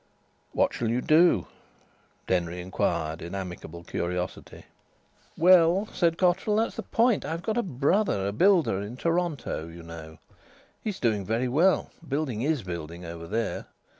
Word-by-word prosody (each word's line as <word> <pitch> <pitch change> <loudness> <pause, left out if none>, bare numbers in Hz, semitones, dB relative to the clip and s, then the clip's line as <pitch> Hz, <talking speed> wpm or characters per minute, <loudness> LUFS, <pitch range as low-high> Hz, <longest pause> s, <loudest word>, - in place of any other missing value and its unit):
"What - - +2
shall 115 - -1
you 120 +2 +1
do?" 165 +6 +4 0.8
Denry 90 -1 -1
inquired 85 -3 -1
in 85 +3 -6
amicable 90 -3 -7
curiosity. 90 +2 -4 0.7
"Well," 180 +3 +5
said 170 -2 +2
Cotterill, 185 +3 +2
"that's 225 +2 0
the - - -2
point. 230 +2 +2
I've 165 +2 -4
got 220 - -1
a 240 - +2
brother 150 - +1
a 100 - 0
builder 165 - +3
in 105 +5 -7
Toronto, 165 - -1
you 85 0 -11
know. 80 -1 -10 0.7
He's 210 -3 -3
doing 110 -4 +1
very 115 +6 0
well; 165 +9 +2 0.2
building 135 -5 -2
is 145 -2 0
building 85 -1 -6
over 85 0 -7
there. 110 +3 -2
120 Hz, 145 wpm, -27 LUFS, -, 0.8 s, Well